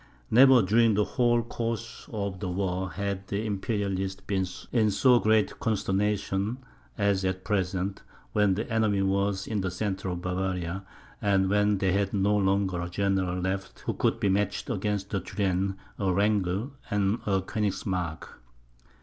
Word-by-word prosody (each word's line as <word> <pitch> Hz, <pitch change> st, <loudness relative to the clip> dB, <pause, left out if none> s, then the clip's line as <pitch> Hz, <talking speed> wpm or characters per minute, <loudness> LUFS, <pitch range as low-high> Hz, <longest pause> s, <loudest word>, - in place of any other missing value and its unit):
Never, 130 Hz, 0 st, +7 dB
during 110 Hz, +3 st, +4 dB
the 105 Hz, -, +3 dB
whole 120 Hz, 0 st, +2 dB
course 115 Hz, -1 st, -5 dB
of 100 Hz, -4 st, -3 dB
the 95 Hz, -, -3 dB
war, 95 Hz, 0 st, -1 dB
had 100 Hz, 0 st, -4 dB
the 100 Hz, +2 st, -2 dB
Imperialists 100 Hz, -2 st, -2 dB
been 95 Hz, -2 st, -1 dB, 0.2 s
in 110 Hz, -3 st, +3 dB
so 120 Hz, +5 st, +5 dB
great 110 Hz, -2 st, +2 dB
consternation 100 Hz, +1 st, 0 dB, 0.4 s
as 100 Hz, -2 st, +1 dB
at 95 Hz, 0 st, -1 dB
present, 95 Hz, -1 st, -1 dB, 0.3 s
when 105 Hz, -3 st, +3 dB
the 110 Hz, +4 st, -3 dB
enemy 110 Hz, -4 st, +1 dB
were 100 Hz, +1 st, +2 dB
in 105 Hz, -3 st, -2 dB
the 95 Hz, -, -1 dB
centre 95 Hz, +1 st, -3 dB
of 90 Hz, -1 st, -4 dB
Bavaria, 90 Hz, 0 st, -2 dB, 0.4 s
and 95 Hz, -2 st, +2 dB
when 105 Hz, 0 st, +3 dB
they 95 Hz, -1 st, +1 dB
had 100 Hz, +1 st, 0 dB
no 100 Hz, +1 st, +2 dB
longer 95 Hz, -2 st, +1 dB
a 85 Hz, -, -4 dB
general 95 Hz, -1 st, 0 dB
left 95 Hz, +1 st, -3 dB
who -, -, -2 dB
could -, -, 0 dB
be 105 Hz, -, +1 dB
matched 100 Hz, +5 st, 0 dB
against 105 Hz, -2 st, -2 dB
a 100 Hz, -, +1 dB
Turenne, 95 Hz, 0 st, -1 dB, 0.2 s
a 95 Hz, -2 st, +1 dB
Wrangel, 100 Hz, +4 st, +1 dB, 0.2 s
and 100 Hz, +2 st, +1 dB
a 95 Hz, -1 st, +3 dB
Koenigsmark. 95 Hz, -4 st, -2 dB
100 Hz, 155 wpm, -28 LUFS, 95-105 Hz, 0.4 s, Never